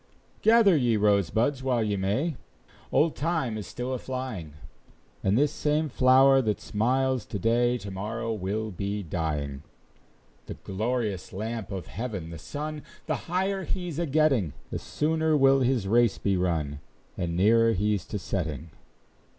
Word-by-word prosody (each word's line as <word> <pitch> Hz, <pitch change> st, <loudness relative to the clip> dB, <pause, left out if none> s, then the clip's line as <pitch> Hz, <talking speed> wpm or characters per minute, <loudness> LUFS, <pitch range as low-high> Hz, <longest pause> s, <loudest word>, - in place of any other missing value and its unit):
Gather 220 Hz, -5 st, +6 dB
ye 120 Hz, -6 st, +2 dB
rosebuds 105 Hz, -, +2 dB
while 125 Hz, -3 st, +1 dB
ye 105 Hz, -1 st, 0 dB
may, 105 Hz, -, 0 dB, 0.6 s
Old 160 Hz, 0 st, +3 dB
Time 155 Hz, -7 st, -1 dB
is 105 Hz, -2 st, -5 dB
still 125 Hz, +2 st, -4 dB
a 130 Hz, -, -2 dB
flying; 125 Hz, -, -5 dB, 0.7 s
And 100 Hz, +3 st, +2 dB
this 145 Hz, +2 st, +3 dB
same 150 Hz, +1 st, 0 dB
flower 135 Hz, +1 st, +5 dB
that 110 Hz, -4 st, -1 dB
smiles 130 Hz, +3 st, 0 dB
to -, -, -4 dB
day, 120 Hz, +4 st, +2 dB
To 100 Hz, -4 st, -8 dB
morrow 110 Hz, +4 st, -3 dB
will 105 Hz, +2 st, -3 dB
be 100 Hz, +2 st, -3 dB
dying. 75 Hz, -5 st, -3 dB, 0.9 s
The -, -, -6 dB
glorious 105 Hz, -2 st, -3 dB
lamp 110 Hz, +2 st, -4 dB
of 95 Hz, -2 st, -4 dB
heaven, 100 Hz, -7 st, -5 dB
the 85 Hz, -, -8 dB
sun, 150 Hz, -, -5 dB, 0.2 s
The -, -, -4 dB
higher 190 Hz, +2 st, 0 dB
he's 175 Hz, -5 st, -3 dB
a 170 Hz, -, 0 dB
getting, 135 Hz, -, +2 dB, 0.2 s
The -, -, -2 dB
sooner 160 Hz, 0 st, 0 dB
will 135 Hz, -1 st, +5 dB
his 125 Hz, -6 st, +1 dB
race 115 Hz, 0 st, +3 dB
be 100 Hz, -1 st, 0 dB
run, 80 Hz, -6 st, -1 dB, 0.4 s
And 85 Hz, -2 st, -2 dB
nearer 115 Hz, +4 st, +4 dB
he's 105 Hz, -1 st, 0 dB
to 105 Hz, -, -3 dB
setting. 85 Hz, -4 st, -4 dB
115 Hz, 150 wpm, -27 LUFS, 95-135 Hz, 0.9 s, Gather